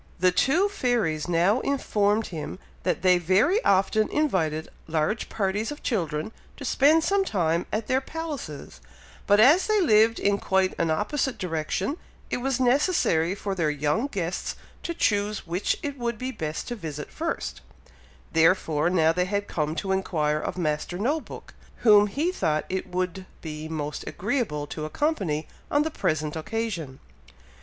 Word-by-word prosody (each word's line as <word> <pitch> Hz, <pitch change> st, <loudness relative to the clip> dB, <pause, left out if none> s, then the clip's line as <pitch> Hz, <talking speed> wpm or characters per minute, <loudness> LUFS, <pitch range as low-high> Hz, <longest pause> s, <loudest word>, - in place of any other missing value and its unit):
The 185 Hz, +1 st, +4 dB
two 315 Hz, -, +3 dB
fairies 235 Hz, -, 0 dB
now 175 Hz, +7 st, +3 dB
informed 215 Hz, -6 st, +1 dB
him, 155 Hz, +2 st, -5 dB, 0.2 s
that 180 Hz, -1 st, -1 dB
they 180 Hz, -1 st, +5 dB
very 195 Hz, -, +3 dB
often 200 Hz, +3 st, +3 dB
invited 165 Hz, -, 0 dB, 0.2 s
large 160 Hz, +7 st, -1 dB
parties 210 Hz, +3 st, -1 dB
of 295 Hz, -, -8 dB
children, 165 Hz, -, -1 dB, 0.3 s
to 280 Hz, -, -7 dB
spend 300 Hz, +5 st, +4 dB
some 395 Hz, +2 st, +2 dB
time 170 Hz, -, 0 dB
at 215 Hz, +1 st, -1 dB
their 260 Hz, +3 st, +1 dB
palaces, 290 Hz, -, -6 dB, 0.5 s
but 205 Hz, +1 st, +5 dB
as 290 Hz, -, +6 dB
they 430 Hz, -1 st, +3 dB
lived 225 Hz, -, +4 dB
in 200 Hz, 0 st, +1 dB
quite 190 Hz, -1 st, +1 dB
an 165 Hz, -, +1 dB
opposite 235 Hz, -, 0 dB
direction, 185 Hz, -, -2 dB, 0.3 s
it -, -, +1 dB
was 265 Hz, +1 st, -1 dB
necessary 245 Hz, -, +2 dB
for 200 Hz, 0 st, -3 dB
their 170 Hz, -5 st, 0 dB
young 150 Hz, -, 0 dB
guests 185 Hz, -9 st, -3 dB, 0.3 s
to 340 Hz, -, -4 dB
choose 205 Hz, -3 st, 0 dB
which 175 Hz, +3 st, -1 dB
it 285 Hz, -2 st, -4 dB
would 235 Hz, -2 st, -2 dB
be 255 Hz, +3 st, -3 dB
best 155 Hz, -9 st, -4 dB
to 240 Hz, -, -3 dB
visit 150 Hz, -8 st, -6 dB
first; -, -, -4 dB, 0.7 s
therefore 165 Hz, -1 st, +3 dB
now 165 Hz, -3 st, +3 dB
they 180 Hz, +1 st, +1 dB
had 200 Hz, +1 st, -2 dB
come 155 Hz, -1 st, -2 dB
to 190 Hz, +2 st, -2 dB
inquire 155 Hz, -6 st, 0 dB
of -, -, -4 dB
Master 155 Hz, +1 st, -1 dB
No 270 Hz, -, +1 dB
book, -, -, -11 dB, 0.3 s
whom 210 Hz, -2 st, +7 dB
he 300 Hz, -, 0 dB
thought 155 Hz, -, 0 dB
it 190 Hz, 0 st, -2 dB
would 185 Hz, +1 st, -3 dB
be 155 Hz, -1 st, -6 dB
most 150 Hz, -2 st, -4 dB
agreeable 205 Hz, -, -2 dB
to 155 Hz, +1 st, -6 dB
accompany 165 Hz, -, -1 dB, 0.2 s
on 290 Hz, +1 st, +3 dB
the 320 Hz, -, -2 dB
present 155 Hz, -, -1 dB
occasion. 165 Hz, -6 st, -4 dB
195 Hz, 160 wpm, -26 LUFS, 160-245 Hz, 0.7 s, whom